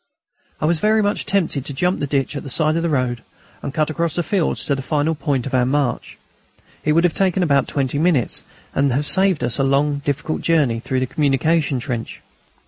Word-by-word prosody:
I - - -1
was 165 0 +2
very 215 +2 +3
much 205 0 -1
tempted 170 -8 +1
to 140 - -4
jump 180 +6 0
the 145 - -2
ditch 140 +1 -1
at 140 - -3
the 140 - -8
side 155 +3 +2
of 165 - 0
the 170 - 0
road 125 -5 0 0.4
and - - -4
cut 155 +2 0
across 165 0 -1
the 175 - 0
fields 185 -2 -1
to 145 - +1
the 135 - -2
final 150 +3 0
point 140 -4 -1
of 135 - -6
our 130 -1 +3
march. 130 -1 -1 0.7
It 150 - +2
would 165 +2 +3
have 175 -3 +2
taken 190 -1 +1
about 140 -4 +2
twenty 140 0 -1
minutes, 160 -7 +1 0.3
and 140 0 +2
have 145 +4 0
saved 190 -1 +2
us 120 -1 0
the 135 - +1
long 140 +2 +1
difficult 145 +2 -2
journey 145 -9 +2
through 130 +2 -2
the - - +1
communication 145 +1 +1
trench. 120 -2 -5
145 Hz, 220 wpm, -20 LUFS, 135-165 Hz, 0.7 s, very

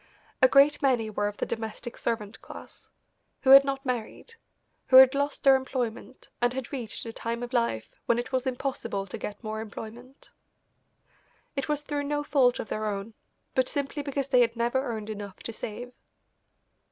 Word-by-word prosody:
A 255 - +8
great 275 +3 +5
many 240 -5 +1
were 205 0 0
of 205 - -5
the - - -1
domestic 225 +1 -5
servant 225 -2 -3
class, - - -12 0.5
who 265 - +4
had 275 0 +11
not 275 0 -3
married, 250 - -4 0.5
who 260 - +3
had 260 +1 +10
lost 285 +1 -2
their 270 -1 +7
employment, 255 -2 -4
and 245 0 +2
had 265 -1 -5
reached 240 -5 -4
a 225 - -6
time 235 +1 -4
of 245 +1 -7
life 230 - 0 0.2
when 235 - +3
it 240 - -3
was 260 0 -1
impossible 255 -6 -3
to 190 - -7
get 210 - -6
more 220 0 -4
employment. 230 +4 -10 1.2
It 275 +1 -3
was 295 -1 0
through 290 -1 -3
no 295 0 -1
fault 270 -4 +3
of - - -5
their 215 0 -2
own, 205 +2 -4 0.4
but 260 -1 +2
simply 285 +1 -2
because 275 -1 -3
they 250 -2 +5
had 230 -1 +2
never 240 +3 +1
earned 220 -4 -4
enough 205 -2 -7
to 230 - -5
save. 240 +3 -7
245 Hz, 180 wpm, -27 LUFS, 220-270 Hz, 1.2 s, had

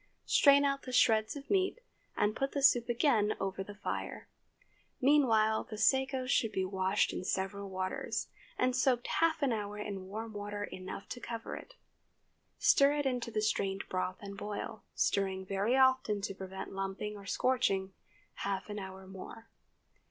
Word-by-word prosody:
Strain 280 0 +6
out 275 0 +1
the 255 - -7
shreds 220 -2 +3
of 280 -1 -8
meat, 390 +4 +2 0.4
and 210 +1 +2
put 270 0 -1
the 280 - -1
soup 240 -3 +5
again 235 -4 +2
over 195 0 -2
the 205 +1 -10
fire. 205 - -4 0.7
Meanwhile 225 -6 +4
the 215 - -8
sago 265 +2 +2
should 240 -4 +2
be 190 -2 0
washed 190 +1 +1
in - - -4
several 195 +2 -2
waters, 185 0 -3 0.3
and 255 0 +2
soaked 250 -1 +2
half 320 -2 +1
an 265 -4 +3
hour 210 -1 -4
in 200 -3 -5
warm 220 +3 -6
water 205 0 -4
enough 185 0 -7
to 245 - -5
cover 230 -1 -5
it. - - -11 0.8
Stir 280 +1 +5
it 290 -1 -1
into 250 -3 -1
the 215 -2 -1
strained 195 -2 0
broth 185 0 -2
and 200 -1 -7
boil—stirring 200 -2 -2
very 200 +6 +1
often 260 -5 +4
to 195 - -3
prevent 190 0 -7
lumping 195 +2 -3
or 200 -1 -11
scorching—half 195 -3 -2
an 205 - -4
hour 190 0 -8
more. 190 +4 -10
210 Hz, 160 wpm, -32 LUFS, 195-255 Hz, 0.8 s, Strain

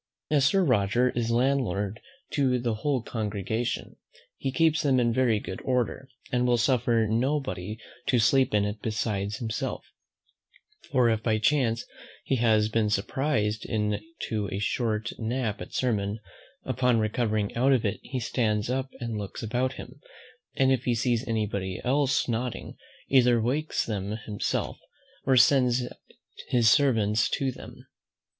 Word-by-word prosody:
As 145 -3 +4
Sir 195 +6 +4
Roger 120 - +2
is 120 -1 -2
landlord 115 -5 0 0.3
to 130 -3 +2
the 120 -2 -1
whole 130 +3 -1
congregation, 110 +1 -3 0.4
he 135 - -3
keeps 160 +4 +3
them 135 -4 +3
in 120 -1 +2
very 120 -4 +2
good 95 -1 -7
order, 125 +1 -1 0.2
and 125 0 +1
will 120 -1 +3
suffer 120 -2 +2
nobody 115 -4 -1 0.3
to 125 - +3
sleep 130 +4 +3
in 100 -1 +3
it 105 +1 -4
besides 105 -2 -2
himself; 115 -2 -4 1.1
for 125 -3 +4
if 110 -1 0
by 110 -1 +1
chance 115 -1 +1 0.4
he 135 - 0
has 110 -2 +3
been 110 -1 +1
surprised 110 0 0
into 105 - -3
a - - -2
short 110 +2 -1
nap 115 -2 -2
at - - -8
sermon, 105 -4 -1 0.5
upon 125 -1 +1
recovering 110 -1 0
out 130 +4 +3
of 125 -4 +2
it 100 - -1
he 130 - -4
stands 110 -2 0
up 130 +1 -1
and 115 -3 -3
looks 100 +3 -6
about 125 +4 -1
him, 130 +1 -10 0.6
and 135 0 +3
if 130 -1 +1
he 120 - +2
sees 120 +1 0
any 110 -2 0
body 95 -2 -4
else 135 +1 +2
nodding, 120 +1 -3 0.3
either 125 -3 +4
wakes 140 +7 -1
them 105 -1 -3
himself, 105 -2 -2 0.5
or 130 -1 +5
sends 125 -1 +4 0.6
his 120 -2 +4
servants 110 -7 +3
to 135 -1 0
them. 125 +2 -12
120 Hz, 150 wpm, -27 LUFS, 110-130 Hz, 1.1 s, or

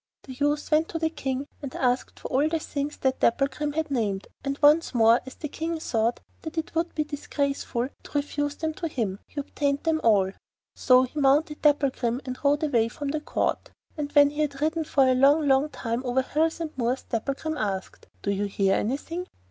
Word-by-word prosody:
The 265 - -9
youth 290 +4 -1
went 310 +2 +3
to 330 - -3
the 320 -1 0
King 270 -3 -3 0.2
and 275 -3 -6
asked 250 -1 0
for - - -6
all 285 +4 +2
the 325 - 0
things 290 -1 -4
that 265 -1 0
Dapplegrim 285 +4 +1
had 315 -1 -2
named, 205 -7 -1
and 275 0 -2
once 300 -1 +4
more, 230 +1 +5
as 260 - -9
the 305 - -5
King 325 +3 -3
thought 230 -5 0 0.2
that 315 +1 -7
it 320 - -3
would 330 +1 -1
be 305 - +1
disgraceful 280 -4 -2 0.2
to - - -12
refuse 290 0 -1
them 320 0 -2
to 335 +1 -4
him, 215 -10 -2
he 295 - -6
obtained 280 0 -1
them 320 -1 +1
all. 200 -4 +4 0.4
So 255 -1 +5
he 260 +4 -4
mounted 290 +2 +2
Dapplegrim 270 -5 +2
and 255 -1 -5
rode 290 +2 +3
away 240 -7 +2
from 280 +4 -5
the 305 +1 -2
Court, - - -1 0.3
and 290 -2 -4
when 285 -1 +6
he 295 +1 -2
had 285 -2 -1
ridden 315 +2 0
for 270 -3 +3
a 255 - +4
long, 285 +4 +4
long 270 +2 +3
time 245 -2 -3
over 260 +1 +1
hills 320 +5 0
and 325 -2 -5
moors, 250 +1 -1
Dapplegrim 275 +7 -3
asked: 195 -5 -4 0.2
'Do 200 - 0
you 200 +1 0
hear 195 -1 +1
anything? 330 - -2
280 Hz, 205 wpm, -26 LUFS, 250-305 Hz, 0.4 s, when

